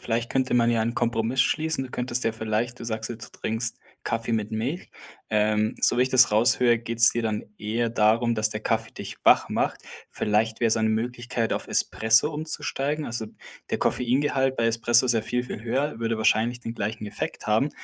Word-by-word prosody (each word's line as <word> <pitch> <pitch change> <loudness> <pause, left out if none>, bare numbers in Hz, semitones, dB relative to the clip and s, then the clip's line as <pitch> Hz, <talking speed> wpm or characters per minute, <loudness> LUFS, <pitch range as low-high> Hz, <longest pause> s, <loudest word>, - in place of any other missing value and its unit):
vielleicht 115 0 -2
könnte 130 -1 0
man 120 -1 +3
ja 115 -1 +1
einen 115 +1 -2
Kompromiss 115 +1 0
schließen. 155 0 +1
Du 125 - -10
könntest 125 -1 -1
dir 115 - +1
vielleicht 110 +2 -2
du 115 - -8
sagst 110 -1 -3
jetzt, 115 -1 -9
du - - -16
trinkst 115 +1 -2 0.3
Kaffee 115 0 -2
mit 110 -1 -1
Milch. 125 +11 -3 0.4
Ähm, 105 0 +1
so - - +3
wie - - +5
ich 130 - +1
das 125 -3 +6
raushöre, 120 +2 +3
geht's 115 0 +4
dir 120 - -2
dann 110 -1 -2
eher 115 +3 -1
darum, 115 +1 +2
dass 110 0 +1
der 105 0 -4
Kaffee 115 0 -2
dich - - -8
wach - - +5
macht. - - -1 0.3
Vielleicht 110 +2 0
wäre 115 - +3
es 110 - +2
eine 110 -1 +1
Möglichkeit, 120 0 -2
auf - - -3
Espresso 110 +8 +3
umzusteigen? 150 -1 -2
Also, 115 -1 -4 0.4
der - - -1
Koffeingehalt 135 +1 0
bei 115 - +1
Espresso 115 +2 +3
ist 120 - +3
ja 110 - +1
viel, 125 +2 -2
viel 115 -3 -7
höher, 130 +2 -2
würde 115 -1 -2
wahrscheinlich 115 +3 +1
den 115 -1 -6
gleichen 105 0 -4
Effekt 105 - -6
haben, 110 +7 +2
115 Hz, 200 wpm, -25 LUFS, 110-125 Hz, 0.4 s, das